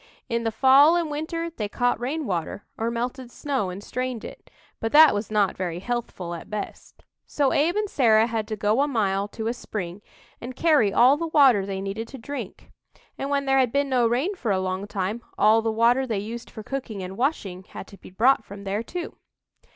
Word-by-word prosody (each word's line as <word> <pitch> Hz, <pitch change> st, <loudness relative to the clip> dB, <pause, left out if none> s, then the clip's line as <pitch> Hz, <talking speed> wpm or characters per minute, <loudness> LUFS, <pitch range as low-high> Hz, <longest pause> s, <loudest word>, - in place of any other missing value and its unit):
In 235 Hz, -1 st, -1 dB
the 225 Hz, -, +1 dB
fall 270 Hz, +7 st, +6 dB
and 335 Hz, -3 st, -1 dB
winter 330 Hz, +3 st, -3 dB
they 215 Hz, -10 st, -4 dB
caught 245 Hz, +1 st, 0 dB
rainwater 240 Hz, -, -3 dB
or 225 Hz, +1 st, -2 dB
melted 245 Hz, +2 st, -4 dB
snow 265 Hz, -6 st, -2 dB
and 185 Hz, +3 st, -7 dB
strained 250 Hz, -1 st, -4 dB
it, -, -, -11 dB, 0.3 s
but 225 Hz, -, -2 dB
that 310 Hz, +1 st, +8 dB
was 205 Hz, +1 st, -3 dB
not 210 Hz, -2 st, +1 dB
very 175 Hz, -3 st, -3 dB
healthful 195 Hz, -4 st, -4 dB
at 170 Hz, -, -8 dB
best. 210 Hz, -1 st, -7 dB, 0.2 s
So 280 Hz, -3 st, +1 dB
Abe 320 Hz, +6 st, +2 dB
and 425 Hz, 0 st, 0 dB
Sarah 225 Hz, -, +4 dB
had 225 Hz, -2 st, -3 dB
to 215 Hz, -, -3 dB
go 210 Hz, +5 st, +1 dB
a 290 Hz, -, +2 dB
mile 200 Hz, -6 st, 0 dB
to 220 Hz, +1 st, -7 dB
a 230 Hz, -, 0 dB
spring 195 Hz, -6 st, -6 dB, 0.4 s
and 245 Hz, +1 st, -7 dB
carry 295 Hz, -10 st, +3 dB
all 255 Hz, +7 st, +5 dB
the 335 Hz, +1 st, -3 dB
water 265 Hz, -11 st, +4 dB
they 195 Hz, -1 st, -4 dB
needed 200 Hz, +4 st, -4 dB
to 270 Hz, -, -10 dB
drink, 280 Hz, +4 st, -8 dB, 0.5 s
and, 275 Hz, -, -3 dB
when 280 Hz, -1 st, 0 dB
there 270 Hz, 0 st, +3 dB
had 255 Hz, -3 st, +2 dB
been 280 Hz, +1 st, 0 dB
no 250 Hz, -3 st, +3 dB
rain 260 Hz, -, 0 dB
for 265 Hz, -, -4 dB
a 190 Hz, -2 st, +2 dB
long 185 Hz, +1 st, -3 dB
time, 205 Hz, +3 st, -3 dB, 0.2 s
all 220 Hz, +2 st, +5 dB
the 225 Hz, 0 st, -1 dB
water 240 Hz, +4 st, +3 dB
they 220 Hz, -4 st, -1 dB
used 225 Hz, +4 st, -6 dB
for 220 Hz, -, -9 dB
cooking 225 Hz, -6 st, -5 dB
and 185 Hz, +1 st, -7 dB
washing 205 Hz, -, -2 dB
had -, -, -9 dB
to 200 Hz, -, -13 dB
be -, -, -13 dB
brought 225 Hz, +6 st, +3 dB
from 200 Hz, 0 st, -10 dB
there, 200 Hz, +2 st, -2 dB
too. 340 Hz, +9 st, -6 dB
230 Hz, 215 wpm, -24 LUFS, 205-270 Hz, 0.5 s, that